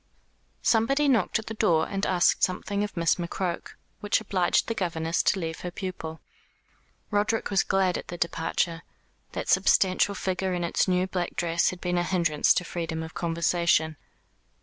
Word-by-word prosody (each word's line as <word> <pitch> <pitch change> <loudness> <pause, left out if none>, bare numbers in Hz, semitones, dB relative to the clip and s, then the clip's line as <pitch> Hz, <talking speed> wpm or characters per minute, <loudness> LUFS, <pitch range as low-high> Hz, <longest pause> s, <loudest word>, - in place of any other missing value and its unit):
Somebody 275 +6 +3
knocked 250 -4 +2
at 220 - -6
the 225 - -5
door 170 -8 +2
and 195 0 -2
asked 180 -1 +3
something 200 +2 0
of 210 - -6
Miss 165 -3 +2
McCroke, 175 0 -4 0.2
which 205 - +1
obliged 190 -5 +1
the 230 - -1
governess 165 -4 -1
to 190 - +2
leave 165 -2 -4
her 180 - -5
pupil. 175 -3 -6 0.9
Roderick 210 +2 0
was 195 - +4
glad 190 -2 +1
at - - -11
her 175 - -5
departure, 165 0 -1 0.5
That - - -4
substantial 190 +1 +3
figure 185 -1 -2
in 175 - -2
its 170 - +1
new 180 0 +2
black 180 -2 -3
dress 170 0 +1
had 185 - -7
been 180 -1 0
a - - +1
hinderance 170 -4 +2
to - - +1
freedom 165 -2 -4
of 160 - -9
conversation. 170 -1 +1
180 Hz, 170 wpm, -26 LUFS, 170-195 Hz, 0.9 s, was